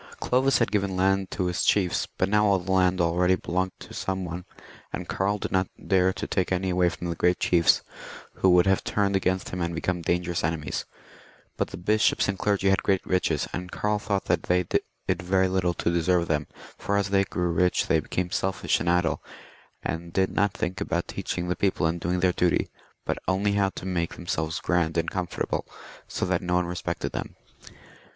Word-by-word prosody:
Clovis 130 +2 +2
had 115 - +1
given 100 -2 0
land 95 +1 +2
to 90 - -2
his 90 0 -1
chiefs, 95 -4 +2
but 95 - +2
now 105 +1 +3
all 100 -1 +4
the 95 +1 -4
land 90 -1 +3
already 90 +2 +3
belonged 95 +1 -2
to - - -12
some 95 -1 -2
one, 85 +1 -6 0.5
and - - -5
Karl 100 +2 0
did - - -5
not 95 -1 +2 0.2
dare 95 -1 +4
to 105 +2 -5
take 95 -3 -1
any 95 0 0
away 90 0 +3
from 85 - -6
the 85 - -2
great 90 +1 +2
chiefs, 85 -2 +4 0.5
who 95 - +4
would 90 -1 +6
have 95 -1 +2
turned 100 -1 +1
against 95 -1 0
him 90 - -4
and 85 0 -2
become 90 +1 -1
dangerous 85 0 -1
enemies. 80 -1 -2 0.7
But - - -1
the - - -8
bishops 105 +4 +2
and 100 -1 -2
clergy 100 -2 +2
had 95 - +2
great 95 -2 +1
riches, 90 0 0
and 90 0 -5
Karl 105 0 0
thought 100 -2 -1
that - - +1
they 90 0 +1
did 85 - -2
very 95 +2 +2
little 90 -2 0
to 85 - 0
deserve 85 0 +2
them, 75 -2 0 0.3
for 100 - 0
as 100 -1 0
they 100 -1 +4
grew 90 -2 -1
rich 90 +2 +2
they 80 - +3
became 90 +3 -3
selfish 95 +1 0
and 85 - -1
idle, 85 -3 +1 0.6
and 85 +1 -4
did 95 +2 +1
not 100 -1 +2
think 95 +3 -3
about 85 -3 -1
teaching 90 0 -3
the 90 - 0
people 95 -3 +1
and 80 +2 0
doing 90 +2 0
their 90 -1 +3
duty, 90 -1 +1 0.3
but - - -1
only 95 +2 +2
how 100 -1 +2
to - - -7
make 85 -3 -1
themselves 80 -2 -3
grand 85 -2 +1
and 85 - 0
comfortable, 90 -2 -2 0.4
so - - -2
that 90 -1 0
no 90 0 0
one 90 0 +2
respected 90 0 -3
them. - - -5
90 Hz, 205 wpm, -26 LUFS, 85-95 Hz, 0.7 s, would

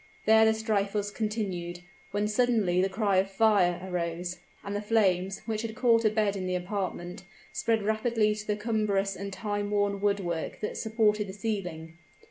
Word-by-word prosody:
There 220 0 +6
the 220 - +4
strife 215 -2 -1
was 205 0 -1
continued, 195 -6 -3 0.3
when 205 +1 0
suddenly 215 -5 +2
the 190 - +1
cry 200 -1 +1
of 190 +1 +2
"Fire" 195 -4 +3
arose, 175 -1 -3 0.2
and 200 0 -4
the 205 - -1
flames, 195 -3 +1
which 215 -1 -2
had 225 -1 -5
caught 235 -2 +3
a - - +6
bed 210 -2 +1
in 185 -1 -3
the 180 - 0
apartment, 180 0 -4 0.3
spread 225 -2 0
rapidly 215 0 +1
to 210 0 -7
the 210 - +1
cumbrous 210 -3 0
and 200 +1 -6
time 205 +1 -3
worn 205 -1 0
woodwork 195 -5 -1
that 210 - -3
supported 215 -2 +1
the 190 - -7
ceiling. 180 -6 -4
205 Hz, 175 wpm, -28 LUFS, 185-215 Hz, 0.3 s, There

